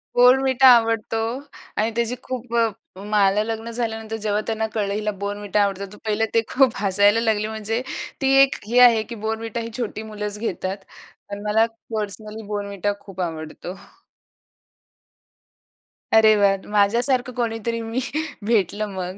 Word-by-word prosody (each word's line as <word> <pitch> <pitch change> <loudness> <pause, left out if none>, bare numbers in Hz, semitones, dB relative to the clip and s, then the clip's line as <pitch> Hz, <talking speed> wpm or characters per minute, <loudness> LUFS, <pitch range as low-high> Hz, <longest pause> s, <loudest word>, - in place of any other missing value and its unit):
Bournvita 260 +1 +5
आवडतो 225 -1 0 0.6
आणि 220 +2 +1
त्याची 235 +1 0
खूप 250 -2 -5
अ, 230 -1 +4 0.3
मला 205 0 +2
लग्न 225 +1 -4
झाल्यानंतर 225 -2 -3
जेव्हा 210 -1 -1
त्यांना 220 0 -1
कळलं, 205 -2 -1
हिला 210 +1 -1
Bournvita 205 0 -3
आवडतो 200 0 -2
तर - - -12
पहिलं 215 +1 +1
ते 230 - +4
खूप 260 -2 +5
हसायला 205 +2 +3
लागले, 215 -2 +1
म्हणजे 220 +2 -3 0.4
ती 270 0 +2
एक 275 - +1
हे 245 +2 +3
आहे 235 -3 +7
की 235 - -8
Bournvita 225 +1 -3
ही 230 - -6
छोटी 220 -2 -4
मुलंच 210 -1 -5
घेतात. 190 -3 -3 0.5
पण 200 0 -6
मला 220 +2 +4 0.3
पर्सनली 215 0 -5
Bournvita 205 -1 -2
खूप 195 -2 -8
आवडतो. 165 +1 -5 2.4
अरे 220 -1 +7
वाह! 200 -1 +4 0.2
माझ्यासारखं 240 +5 +2
कोणीतरी 230 0 -2
मी 225 +2 -3 0.5
भेटलं 215 -2 +1
मग. 185 +1 -5
220 Hz, 140 wpm, -22 LUFS, 205-230 Hz, 2.4 s, आहे